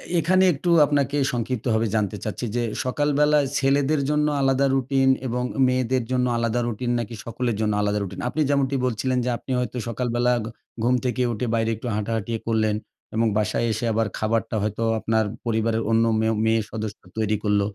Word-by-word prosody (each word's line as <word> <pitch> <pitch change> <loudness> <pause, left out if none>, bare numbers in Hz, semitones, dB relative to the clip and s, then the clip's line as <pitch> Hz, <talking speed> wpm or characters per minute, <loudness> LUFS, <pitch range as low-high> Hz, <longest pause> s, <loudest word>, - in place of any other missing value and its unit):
এ - - +4
এখানে 185 +4 +3
একটু 160 +5 -3 0.2
আপনাকে 145 0 0
সংক্ষিপ্তভাবে 115 -2 -1
জানতে 100 -4 0
চাচ্ছি 110 +3 -4
যে 120 - +1 0.2
সকালবেলা 150 +2 +2 0.2
ছেলেদের 140 +1 +2
জন্য 150 0 +2
আলাদা 135 0 +3
রুটিন 135 0 +2 0.2
এবং 125 +1 -1 0.2
মেয়েদের 130 -1 +1
জন্য 125 -1 +2
আলাদা 115 +1 0
রুটিন? 120 +1 -2
নাকি 115 0 -5
সকলের 120 0 -2
জন্য 105 -1 +1
আলাদা 105 0 0
রুটিন? 95 0 -7
আপনি 155 - -1
যেমনটি 140 -1 +1
বলছিলেন 130 +2 0
যে - - 0
আপনি 130 - -8
হয়তো 125 0 -3
সকালবেলা 120 +1 0
ঘ - - -5 0.4
ঘুম 125 +1 +3
থেকে 125 0 0
উঠে 115 +3 -3
বাইরে 115 0 +1
একটু 120 - -7
হাঁটাহাঁটি 110 +1 -2
এ - - -13
করলেন। 110 -2 +1 0.4
এবং 115 0 +2
বাসায় 110 +2 0
এসে 110 +3 -3
আবার 110 0 +1
খাবারটা 115 +1 -1
হয়তো 105 +2 -2 0.2
আপনার 110 0 +1 0.2
পরিবারের 115 0 0
অন্য 115 0 +4 0.2
মেয়ো 110 0 +1
মেয়ে 110 0 +3
সদস্য 110 -2 -5 0.2
তৈরি 110 -1 +1
করল। 105 -1 +2
120 Hz, 180 wpm, -24 LUFS, 110-130 Hz, 0.4 s, এ